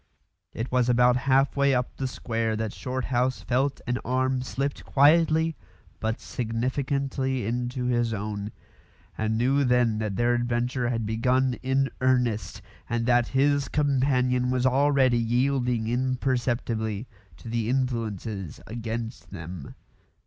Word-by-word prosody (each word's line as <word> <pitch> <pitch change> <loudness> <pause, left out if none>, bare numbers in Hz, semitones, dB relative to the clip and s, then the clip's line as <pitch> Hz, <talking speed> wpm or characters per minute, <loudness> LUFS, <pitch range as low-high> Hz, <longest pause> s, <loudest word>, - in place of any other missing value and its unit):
It 115 +3 -5
was 125 -1 +2
about 125 0 +5
half 135 +1 +3
way 140 -1 +3
up 125 0 -2
the 135 - -1
square 115 -3 -2
that 110 -1 -3
Shorthouse 130 0 -1
felt 135 +2 0
an 125 0 -1
arm 130 0 0
slipped 135 +2 -3
quietly 160 +2 +4 0.4
but 110 +1 -2
significantly 130 +2 -2
into 125 +2 -2
his 120 -2 +1
own, 105 0 -4 0.6
and 110 0 -1
knew 135 +4 +2
then 125 -4 +2
that 105 -3 -2
their 120 +2 +2
adventure 120 +1 0
had 115 -2 -1
begun 125 +4 +1
in 135 +1 +1
earnest, 125 -4 0 0.3
and 120 -1 0
that 120 -1 +3
his 145 0 +3
companion 130 -3 +1
was 125 0 +1
already 130 -2 +3
yielding 125 0 +1
imperceptibly 120 -3 -1 0.3
to - - -12
the 115 -1 -1
influences 115 - -2
against 115 -5 -5
them. 80 -2 -8
125 Hz, 125 wpm, -26 LUFS, 115-130 Hz, 0.6 s, about